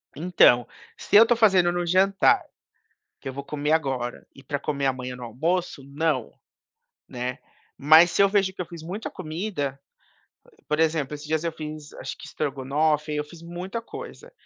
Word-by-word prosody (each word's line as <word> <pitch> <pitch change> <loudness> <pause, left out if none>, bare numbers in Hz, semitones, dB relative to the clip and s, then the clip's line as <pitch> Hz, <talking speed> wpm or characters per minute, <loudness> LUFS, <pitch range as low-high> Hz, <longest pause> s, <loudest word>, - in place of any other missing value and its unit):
Então, 150 -7 +4 0.3
se - - -2
eu 225 - +10
tô 240 +1 +3
fazendo 190 -6 +4
no 175 0 -2
jantar, 190 +3 +3 0.8
que - - -7
eu - - -4
vou 140 +1 -7
comer 150 +1 -2
agora, 135 -6 -1
e 135 - -15
pra 140 +1 -3
comer 140 -1 -2
amanhã 130 -1 -2
no 125 - -8
almoço, 160 +6 -2
não, 140 -3 -1 0.8
né, 125 0 -4 0.4
mas 160 +4 +7
se - - +2
eu 200 - +5
vejo 195 -2 +1
que 180 - -6
eu - - -4
fiz 165 -1 -10
muita 195 +6 -5
comida, 155 -5 -4 0.9
por 150 +1 0
exemplo, 155 -3 +1
esses 145 - -10
dias 160 +1 0
eu 165 - -1
fiz 155 -1 -8
acho - - -7
que - - -11
estrogonofe, 150 +2 -1
aí 150 - -2
eu 150 - -1
fiz 165 +2 -14
muita 180 +6 -6
coisa. - - -10
155 Hz, 180 wpm, -25 LUFS, 140-175 Hz, 0.9 s, eu